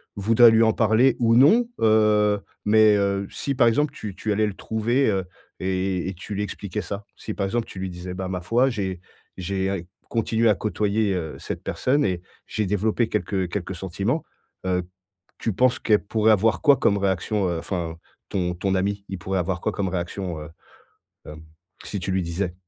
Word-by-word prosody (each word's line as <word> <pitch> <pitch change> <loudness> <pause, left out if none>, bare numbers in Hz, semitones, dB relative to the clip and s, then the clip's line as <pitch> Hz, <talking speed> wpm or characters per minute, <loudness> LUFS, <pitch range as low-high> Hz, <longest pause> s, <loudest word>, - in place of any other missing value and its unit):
voudrais 115 +4 +6
lui 110 0 +5
en 110 -1 +4
parler 115 +4 +3
ou 115 -1 +4
non. 210 - +6
Heu, 105 -1 +4 0.3
mais, 110 0 +6
heu, 100 0 0
si 140 - -3
par 125 -3 +4
exemple, 145 +5 +2
tu 105 -9 -7
tu 110 - -3
allais 105 +1 +2
le 100 - -5
trouver, 115 +6 0
heu, 95 -2 -1 0.3
et 95 -1 -1
et - - -4
tu 95 +4 -8
lui 100 - -2
expliquais 105 0 -4
ça? 100 0 -6
Si - - -6
par 100 - -1
exemple, 115 +4 -1
tu - - -11
lui 95 0 -3
disais: 90 +1 -7
«Bah 95 0 -4
ma 90 -1 -3
foi, 120 +8 +2
j'ai 95 -5 -3 0.4
j'ai 95 +1 -2
ai 95 -3 -3 0.2
continué 115 0 +1
à 105 - +4
côtoyer, 105 +1 0
heu, 80 -4 -3
cette - - -6
personne 140 +3 +1
et 90 -3 -1 0.3
j'ai 110 - -1
développé 105 +4 0
quelques 95 -3 -1
quelques 95 -1 -4
sentiments». 95 - -2 0.4
Heu, 90 -1 0 0.6
tu 115 - -1
penses 125 +5 +2
qu'elle 105 -1 +3
pourrait 110 +1 +2
avoir 110 +2 +2
quoi 145 -3 +6
comme 100 - +2
réaction 95 +1 0
heu, 85 -1 -1
enfin, 85 -2 -4 0.3
ton 90 -2 -1
ton 95 +2 -1
ami, 100 +1 -1
il 95 0 -5
pourrait 95 +2 -2
avoir 90 +1 -2
quoi - - 0
comme 100 -2 -2
réaction, 90 -1 -4
heu, 75 +2 -9 0.8
hem, 75 +1 -10 0.4
si 100 - -4
tu 95 +1 -2
lui 95 0 +1
disais? 90 +1 -3
100 Hz, 195 wpm, -24 LUFS, 95-110 Hz, 0.8 s, voudrais